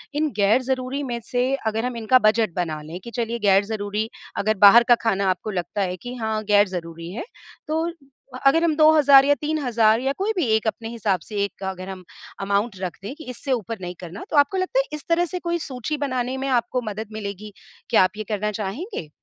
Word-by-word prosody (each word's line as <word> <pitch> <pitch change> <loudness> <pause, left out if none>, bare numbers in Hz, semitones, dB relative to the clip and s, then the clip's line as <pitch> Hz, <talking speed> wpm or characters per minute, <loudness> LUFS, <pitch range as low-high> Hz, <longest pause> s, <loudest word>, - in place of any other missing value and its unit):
इन 305 +1 +1
ग़ैर-ज़रूरी 255 +6 +1
में 240 -1 -2
से 245 0 0 0.2
अगर 220 +2 -1
हम 250 -1 -3
इनका 230 +3 +4
बजट 215 -3 +2
बना 160 -4 -2
लें 160 +4 -8
कि 235 - -8
चलिए, 235 -1 -2
ग़ैर-ज़रूरी 205 +1 +1 0.3
अगर 215 +1 +1
बाहर 230 +4 +9
का 240 - +8
खाना 200 -4 +1
आपको 185 +3 -2
लगता 180 +2 -3
है 180 -1 -1
कि 245 +7 -8
हाँ, 220 -2 -2
ग़ैर-ज़रूरी 180 -5 0
है, 220 - -4 0.4
तो 320 +2 0
अ - - -5 0.6
अगर 325 +5 +4
हम 325 -2 +2
2000 300 -3 +7
या 285 - +5
3000 245 -8 +2
या 270 +1 0
कोई 400 +3 0
भी 345 - +2
एक 220 0 -1
अपने 225 +1 -3
हिसाब 215 -5 -1
से 215 - -10
एक 200 -1 -6
अगर 190 0 -5
हम 190 -1 -8 0.4
अमाउंट 200 +1 0
रख 180 -4 -4
दें 210 +6 -5
कि 315 - -11
इससे 250 +3 -5
ऊपर 230 -2 -2
नहीं 180 0 -5
करना, 175 +1 -8
तो 310 - 0
आपको 285 +6 +4
लगता 375 +7 0
है, - - +2
इस 300 -2 -6
तरह 340 +1 +3
से 360 +2 -5
कोई 345 0 -2
सूची 260 +4 -3
बनाने 255 -2 -2
में 270 +1 -3
आपको 245 0 +1
मदद 215 +1 -5
मिलेगी? 205 -1 -6 0.4
कया 225 -5 +5
आप 185 +2 -1
ये 215 - -3
करना 210 0 -1
चाहेंगे? 210 - -5
225 Hz, 210 wpm, -23 LUFS, 200-270 Hz, 0.6 s, बाहर